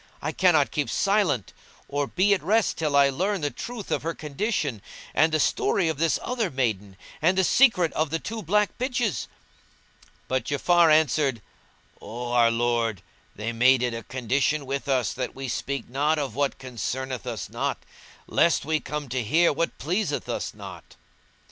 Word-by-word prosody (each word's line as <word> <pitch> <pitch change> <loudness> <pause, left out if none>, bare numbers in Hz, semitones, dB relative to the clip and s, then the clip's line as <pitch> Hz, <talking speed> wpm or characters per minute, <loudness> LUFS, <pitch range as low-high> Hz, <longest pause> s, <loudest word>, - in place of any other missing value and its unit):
I - - -3
cannot 165 -6 +3
keep 145 -2 -1
silence 195 - +1 0.3
or 145 0 -1
be 190 +6 +3
at 195 - 0
rest 215 +7 +2
till 155 -3 -1
I 140 -1 +6
learn 185 +7 -1
the 145 -1 -1
truth 230 - -7
of - - 0
her 165 +2 -3
condition 150 - -2 0.3
and 160 +2 +3
the 155 - +1
story 165 +4 +1
of 155 -3 -3
this 165 -1 +2
other 240 -5 -1
maiden 105 - -2 0.2
and 180 +4 +3
the 190 - +4
secret 195 -7 +4
of 155 -1 0
the 165 - -1
two 220 +6 -6
black 210 +3 +1
bitches." 245 -5 -1 1.0
But 130 0 -1
Ja'afar 170 +3 +3
answered, 150 -5 +3 0.6
"O 120 +2 -6
our 120 -1 +5
lord, 115 -4 0 0.3
they 110 +3 -4
made 125 +2 +4
it 120 -1 0
a 115 - -4
condition 135 +5 -1
with 140 +2 -4
us 130 -3 +1
that 130 -1 -4
we 135 0 -5
speak 135 +1 -3
not 145 +5 +1
of 140 -6 -3
what 140 +2 -1
concerneth 130 0 -5
us 115 -3 -4
not, - - -2 0.5
lest 170 -4 +2
we 155 +1 +1
come 150 -1 -5
to 130 +1 -1
hear 160 +10 +3
what 165 +4 -2
pleaseth 185 +8 -2
us - - -4
not." - - -11
145 Hz, 175 wpm, -25 LUFS, 130-175 Hz, 1.0 s, I